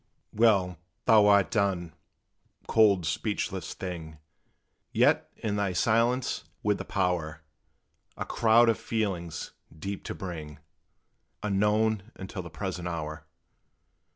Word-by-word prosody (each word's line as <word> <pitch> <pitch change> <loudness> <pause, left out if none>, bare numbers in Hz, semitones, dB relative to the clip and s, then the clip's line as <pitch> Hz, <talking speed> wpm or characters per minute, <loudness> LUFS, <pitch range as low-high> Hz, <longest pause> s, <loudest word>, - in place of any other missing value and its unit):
Well, 100 -6 +3 0.3
thou 110 -3 +6
art 100 -2 +5
done, 95 -6 0 0.7
cold, 100 -6 +4
speechless 80 - -2
thing; 80 -4 -6 0.7
Yet, - - +3
in 105 -2 -2
thy 100 -2 0
silence, 115 +6 +1 0.2
with 105 -1 +1
the - - -5
power 85 -5 -1 0.7
A - - -3
crowd 115 +1 +4
of 115 - +2
feelings 95 -8 -3 0.3
deep 100 +5 -5
to - - -4
bring 80 -6 -7 0.9
Unknown 105 +1 +1
until 95 0 -6
the 85 - -9
present 90 0 -4
hour. 80 -2 -5
95 Hz, 110 wpm, -28 LUFS, 85-110 Hz, 0.9 s, thou